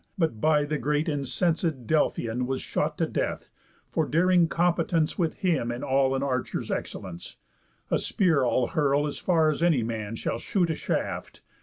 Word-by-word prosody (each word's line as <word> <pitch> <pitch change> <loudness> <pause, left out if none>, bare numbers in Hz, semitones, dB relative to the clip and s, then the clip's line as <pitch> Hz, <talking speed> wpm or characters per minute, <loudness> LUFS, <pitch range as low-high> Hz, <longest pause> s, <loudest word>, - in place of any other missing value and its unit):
But 160 - 0
by 150 -2 +3
the 150 0 -2
great 150 +1 0
incenséd 150 0 -1
Delphian 125 -4 0
Was 130 0 -1
shot - - -2
to - - +1
death, - - -3 0.4
for - - 0
daring 175 +2 +4
competence 170 -1 +1
With 165 -3 0
him 165 - 0
in 120 +1 -5
all 135 0 +2
an 135 - -1
archer's 130 -3 -2
excellence. 85 - -5 0.6
A - - +3
spear 165 -9 +2
I'll 125 0 +2
hurl 145 -2 +1
as 145 - -4
far 160 -4 +3
as 150 - -4
any 165 -8 +3
man 110 -1 -4
Shall 115 - -3
shoot 175 - 0
a - - -1
shaft. - - -3
150 Hz, 170 wpm, -27 LUFS, 130-165 Hz, 0.6 s, daring